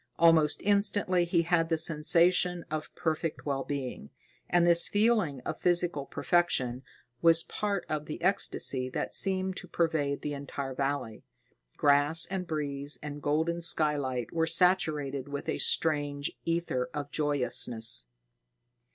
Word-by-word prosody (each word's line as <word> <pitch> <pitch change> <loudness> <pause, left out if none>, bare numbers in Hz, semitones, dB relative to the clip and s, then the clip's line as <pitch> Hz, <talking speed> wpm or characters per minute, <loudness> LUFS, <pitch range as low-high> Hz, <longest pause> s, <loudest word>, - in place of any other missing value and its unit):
Almost 165 -3 +3
instantly 200 -3 +2
he 170 -1 +1
had 165 -1 0
the 165 - +1
sensation 170 +3 +3
of 155 0 -4
perfect 160 0 -3
well 135 -2 -2
being, 130 - -6 0.4
and 175 -1 +3
this 170 0 +6
feeling 205 - +1
of - - -6
physical 175 -5 +1
perfection 130 -8 0 0.4
was 165 0 +5
part 200 -3 -3
of 150 -1 -4
the 155 - -6
ecstasy 135 -8 +1
that - - -4
seemed 190 -1 0
to - - -8
pervade 155 -4 -1
the 150 - -3
entire 140 -1 -6
valley. 135 -4 -4 0.5
Grass 145 +3 +4
and 185 -2 -5
breeze 145 -2 -2
and 145 0 -7
golden 160 +4 -1
skylight 145 -7 0
were 165 -1 0
saturated 155 -6 +1
with 140 0 -6
a - - -2
strange 145 -2 -1
ether 165 -7 -2
of 145 -1 -5
joyousness. 125 - +2
155 Hz, 135 wpm, -28 LUFS, 140-175 Hz, 0.5 s, this